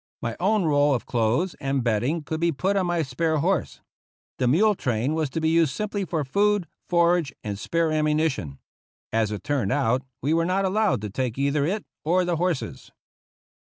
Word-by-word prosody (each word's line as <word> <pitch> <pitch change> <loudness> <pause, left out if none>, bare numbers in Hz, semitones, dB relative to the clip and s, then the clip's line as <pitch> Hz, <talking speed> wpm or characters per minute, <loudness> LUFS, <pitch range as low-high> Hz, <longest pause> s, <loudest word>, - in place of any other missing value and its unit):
My 115 - -3
own 200 +3 +2
roll 145 -2 +3
of 120 - -4
clothes 120 +10 0
and 135 -1 0
bedding 125 +8 0
could 160 +1 -4
be 170 0 +2
put 185 +7 0
on 190 -2 +1
my 175 -2 +1
spare 155 +4 -1
horse. 175 +1 -1 0.6
The 125 - +2
mule 205 - +4
train 125 - -1
was 155 -3 -1
to 160 - -3
be 160 0 +1
used 160 -4 +2
simply 205 -2 -2
for 160 -4 -2
food, 200 +5 +1 0.2
forage, 170 -3 +3
and 100 -2 -4
spare 165 +7 0
ammunition. 150 - 0 0.6
As 110 -2 +2
it 105 - -5
turned 135 -9 0
out, 130 -3 +1 0.2
we 145 +4 0
were 165 0 +2
not 185 +3 +1
al 190 - 0
lowed 210 - +1
to 105 -2 -5
take 125 +1 -2
either 140 +1 +1
it 205 +4 -2 0.2
or 180 +3 +2
the 175 -2 0
horses. 175 -3 -2
155 Hz, 195 wpm, -25 LUFS, 130-175 Hz, 0.6 s, mule